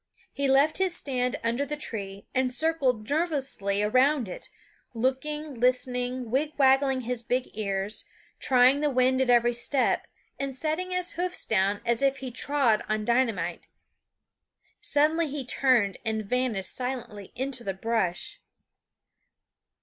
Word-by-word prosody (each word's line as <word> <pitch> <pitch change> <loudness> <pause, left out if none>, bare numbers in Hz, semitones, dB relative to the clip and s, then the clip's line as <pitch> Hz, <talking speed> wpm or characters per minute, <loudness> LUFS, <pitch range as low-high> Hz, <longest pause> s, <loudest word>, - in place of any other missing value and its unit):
He 280 0 0
left 275 +5 +4
his 375 -2 +1
stand 250 -3 -1
under 235 +4 0
the 295 +1 -4
tree 200 -8 -6
and 255 -1 +1
circled 255 -6 0
nervously 275 - 0
around 255 +3 +3
it, 180 - -7 0.5
looking, 285 +5 -1
listening, 250 0 0
wigwagging 270 -1 +2
his 245 0 -2
big 245 +2 -2
ears, 200 0 -2 0.4
trying 255 +1 +4
the 300 0 +1
wind 260 0 +2
at 260 - +1
every 240 0 +4
step, 255 +3 0 0.3
and 275 -1 -3
setting 315 +6 -2
his 365 -1 -1
hoofs 355 +1 -3
down 200 -1 +1
as 235 +1 +1
if 275 0 +2
he 260 -2 -6
trod 255 -3 +1
on 215 0 -1
dynamite. 225 -9 0 1.1
Suddenly 310 +3 +2
he 275 -2 -4
turned 240 -7 +2
and 220 -2 -1
vanished 230 -4 -1
silently 240 -6 -5
into 260 -1 -1
the 195 -4 -3
brush. 195 -4 -2
255 Hz, 135 wpm, -27 LUFS, 225-280 Hz, 1.1 s, left